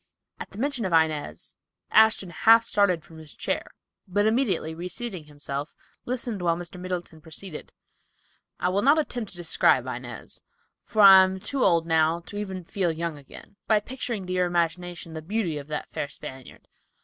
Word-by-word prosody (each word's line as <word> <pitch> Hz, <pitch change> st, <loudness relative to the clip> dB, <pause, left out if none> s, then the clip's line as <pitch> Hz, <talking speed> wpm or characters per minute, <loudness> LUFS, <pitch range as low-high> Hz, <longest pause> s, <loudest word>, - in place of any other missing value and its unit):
At -, -, -7 dB
the -, -, -13 dB
mention 265 Hz, 0 st, -1 dB
of 185 Hz, -, -2 dB
Inez, 155 Hz, -, 0 dB, 0.4 s
Ashton 220 Hz, -4 st, +4 dB
half 225 Hz, +7 st, +6 dB
started 185 Hz, -7 st, +2 dB
from 160 Hz, -1 st, -13 dB
his 155 Hz, -2 st, -13 dB
chair, -, -, -3 dB, 0.4 s
but 205 Hz, +3 st, +1 dB
immediately 220 Hz, -9 st, +1 dB
reseating 180 Hz, +1 st, -6 dB
himself, 145 Hz, -1 st, -6 dB, 0.3 s
listened 240 Hz, -5 st, -3 dB
while 170 Hz, -1 st, +1 dB
Mr. 175 Hz, +1 st, -8 dB
Middleton 175 Hz, -3 st, -5 dB
proceeded: 160 Hz, +1 st, -8 dB, 0.9 s
"I 180 Hz, -, +1 dB
will 195 Hz, +2 st, +1 dB
not 285 Hz, +6 st, +5 dB
attempt 245 Hz, -8 st, -2 dB
to 175 Hz, -, -8 dB
describe 175 Hz, -2 st, +3 dB
Inez, -, -, -7 dB, 0.4 s
for 215 Hz, -1 st, +2 dB
I 190 Hz, -1 st, +10 dB
am 190 Hz, 0 st, -2 dB
too 255 Hz, +7 st, -1 dB
old 170 Hz, -1 st, +3 dB
now 160 Hz, 0 st, +2 dB
to 205 Hz, +4 st, -9 dB
even 190 Hz, -3 st, -5 dB
feel 180 Hz, -1 st, -1 dB
young 165 Hz, 0 st, -3 dB
again, 145 Hz, +7 st, -14 dB
by 215 Hz, -1 st, +4 dB
picturing 230 Hz, -3 st, -4 dB
to 180 Hz, -, -4 dB
your 180 Hz, -1 st, +2 dB
imagination 175 Hz, 0 st, -2 dB
the 160 Hz, -, -5 dB
beauty 175 Hz, -3 st, -2 dB
of 140 Hz, -, -10 dB
that 150 Hz, -1 st, -4 dB
fair -, -, -3 dB
Spaniard. 130 Hz, -2 st, -10 dB
180 Hz, 175 wpm, -26 LUFS, 160-210 Hz, 0.9 s, I